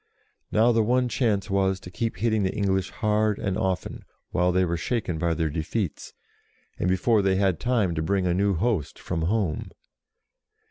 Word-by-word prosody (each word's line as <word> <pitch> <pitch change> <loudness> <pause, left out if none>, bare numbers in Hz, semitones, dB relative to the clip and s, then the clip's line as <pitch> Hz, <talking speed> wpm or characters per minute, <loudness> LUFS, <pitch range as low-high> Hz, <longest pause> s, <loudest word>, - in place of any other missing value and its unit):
Now 115 +3 +4
the 115 -1 +3
one 125 +3 +2
chance 110 -6 0
was 95 -1 +1
to 90 - -10
keep 110 +1 -3
hitting 110 +1 +1
the 95 -1 +1
English 95 -2 0
hard 105 -1 +1
and 95 -2 -2
often, 95 -1 -2 0.3
while 90 +1 +2
they 90 +1 +2
were 85 0 -1
shaken 90 -2 -2
by 85 -1 +1
their 80 -2 -1
defeats, 80 +2 -3 0.7
and 90 - +1
before 105 +4 +3
they 95 -1 +2
had 95 -3 +1
time 115 -8 +1
to 80 - -2
bring 95 +3 0
a 90 - +2
new 100 +1 +2
host 95 - -1
from 85 -2 -3
home. 95 -1 -1
95 Hz, 180 wpm, -25 LUFS, 90-110 Hz, 0.7 s, Now